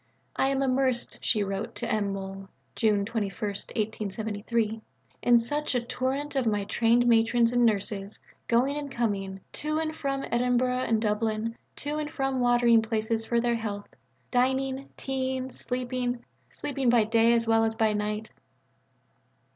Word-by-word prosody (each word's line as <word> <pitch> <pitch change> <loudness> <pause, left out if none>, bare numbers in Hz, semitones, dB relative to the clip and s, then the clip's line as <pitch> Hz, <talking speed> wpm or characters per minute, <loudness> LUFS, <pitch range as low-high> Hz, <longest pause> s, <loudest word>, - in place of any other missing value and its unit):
"I 270 - +2
am 275 0 +1
immersed," 260 -2 0
she 215 -3 +2
wrote 195 +2 -4
to 240 - -3
M. 210 -3 0
Mohl 195 0 -6 0.3
(June 210 -3 +2
21, 205 -3 -3
1873), 215 +2 -2 0.4
"in 240 -1 +6
such 290 +4 -1
a - - +4
torrent 260 +4 -2
of 260 -3 +1
my 210 -2 +1
trained 235 +4 +3
matrons 230 0 +4
and 245 0 +3
nurses, 205 -2 0 0.3
going 255 +5 +2
and 290 -1 -4
coming, 195 -5 -2
to 305 +1 -1
and 315 0 -2
from 275 -3 -2
Edinburgh 250 +1 +2
and 225 -1 +2
Dublin, 220 +1 -1 0.2
to 295 +1 -3
and 300 -1 -3
from 270 -3 -1
watering 240 -2 +5
places 225 0 -1
for 235 - +2
their 240 0 +1
health, 205 -3 -4 0.4
dining, 265 +2 +1
tea 265 -1 -1
ing, 260 0 -5
sleeping 250 -1 -3 0.2
sleeping 275 -3 -1
by 235 -2 +5
day 225 +2 +4
as 230 -1 +2
well 225 0 +4
as 225 0 0
by 220 -2 +2
night." 210 +1 -2
235 Hz, 155 wpm, -28 LUFS, 215-255 Hz, 0.4 s, in